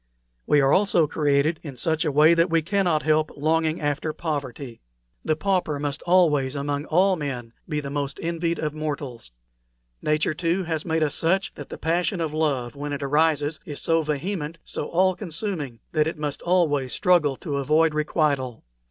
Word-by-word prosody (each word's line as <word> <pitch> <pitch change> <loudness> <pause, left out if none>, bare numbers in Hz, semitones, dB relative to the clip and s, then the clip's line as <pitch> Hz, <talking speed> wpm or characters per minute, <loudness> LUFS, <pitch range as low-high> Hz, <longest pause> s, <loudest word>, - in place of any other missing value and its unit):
We 145 - +5
are 135 +1 +4
also 190 -4 +4
created 150 +1 +1
in 140 -5 -8
such 160 +5 0
a 150 - +1
way 155 +4 +6
that 170 +2 +3
we 165 -1 +2
cannot 175 -3 +1
help 155 0 +2
longing 160 +2 +1
after 145 +1 -1
poverty. 140 -6 -5 0.4
The 155 - +1
pauper 175 -4 0
must 145 0 -3
always, 150 -7 +3
among 145 +1 -2
all 185 +4 +3
men, 130 -7 -5 0.2
be 150 -2 -1
the 140 -1 -6
most 140 -1 -3
envied 170 0 -1
of 150 -1 -2
mortals. 145 - -5 0.7
Nature, 155 +1 +1
too, 170 +4 0
has 160 -2 -3
made 160 -2 +1
us 150 - 0
such 190 +4 +1
that - - -9
the - - -7
passion 175 +3 0
of 160 -2 -2
love, 140 -7 -1
when 145 +1 -4
it 140 0 -4
arises, 150 +1 +1
is 150 -7 -6
so 165 0 +2
vehement, 155 +2 -3
so - - -4
all 185 +2 +3
consuming 165 - -4
that 155 -1 +2
it 160 - -3
must 150 -2 -3
always 150 -7 +1
struggle 175 -8 +3
to 145 -1 -4
avoid 155 +3 +3
requital. 145 -5 0
155 Hz, 180 wpm, -24 LUFS, 145-165 Hz, 0.7 s, way